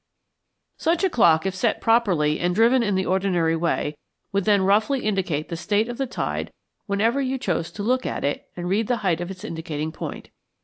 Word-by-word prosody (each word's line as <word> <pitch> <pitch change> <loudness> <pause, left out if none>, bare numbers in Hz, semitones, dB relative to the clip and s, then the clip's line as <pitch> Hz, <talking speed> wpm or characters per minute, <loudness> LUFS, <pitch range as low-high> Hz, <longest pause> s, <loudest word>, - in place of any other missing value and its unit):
Such 335 +3 +1
a 380 - +2
clock, 165 - +4
if 190 - 0
set 185 - 0
properly 185 -10 +2
and 175 0 0
driven 235 +4 +4
in 205 -4 0
the 190 0 0
ordinary 180 -4 +1
way, 160 -2 -1 0.4
would 200 -1 0
then 205 -2 +4
roughly 215 +7 +2
indicate 185 -8 -1
the 170 - -3
state 205 +6 0
of 240 +1 -6
the 270 - 0
tide - - -3 0.4
whenever 225 +7 +1
you 265 0 -1
chose 175 -9 -2
to 205 - -5
look 255 +3 +1
at - - -3
it 145 - -2
and 175 0 -4
read 205 +4 +1
the 245 - +1
height 175 -2 +1
of 175 - -4
its 190 0 -9
indicating 160 -5 -4
point. - - -7
195 Hz, 205 wpm, -23 LUFS, 170-230 Hz, 0.4 s, clock